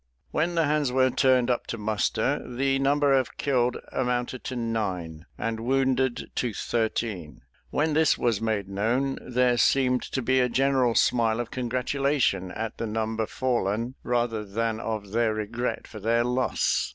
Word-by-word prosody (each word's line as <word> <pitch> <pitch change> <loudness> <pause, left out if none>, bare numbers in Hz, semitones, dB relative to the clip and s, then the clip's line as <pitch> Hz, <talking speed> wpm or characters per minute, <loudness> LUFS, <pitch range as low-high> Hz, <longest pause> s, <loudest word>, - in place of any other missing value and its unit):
When 170 +3 0
the 165 - +3
hands 145 -2 +1
were 130 0 +3
turned 130 -1 +3
up 120 - -2
to 115 - -4
muster, 105 -1 0
the 135 +2 0
number 140 +1 +3
of 130 -2 0
killed 125 -3 +1
amounted 125 0 -2
to 130 - -4
nine, 95 -8 -3
and 115 +1 -2
wounded 130 +1 0
to 120 -3 -1
thirteen. 110 -8 -2 0.3
When 155 +1 0
this 160 0 +3
was 115 -4 0
made 110 -3 -1
known, 115 +8 0
there 125 -1 +1
seemed 125 0 +3
to 130 - -3
be 130 +2 +3
a 125 -1 +2
general 130 -2 +2
smile 115 -2 +3
of 120 - -4
congratulation 125 -5 0
at 110 +4 -5
the 115 - -2
number 110 0 -2
fallen, 120 -2 -1
rather 120 -3 0
than 110 +2 -2
of 110 -3 -4
their 115 -1 +1
regret 115 +3 -3
for 110 - -9
their 115 +3 +2
loss. 125 +1 0
120 Hz, 160 wpm, -26 LUFS, 110-130 Hz, 0.3 s, the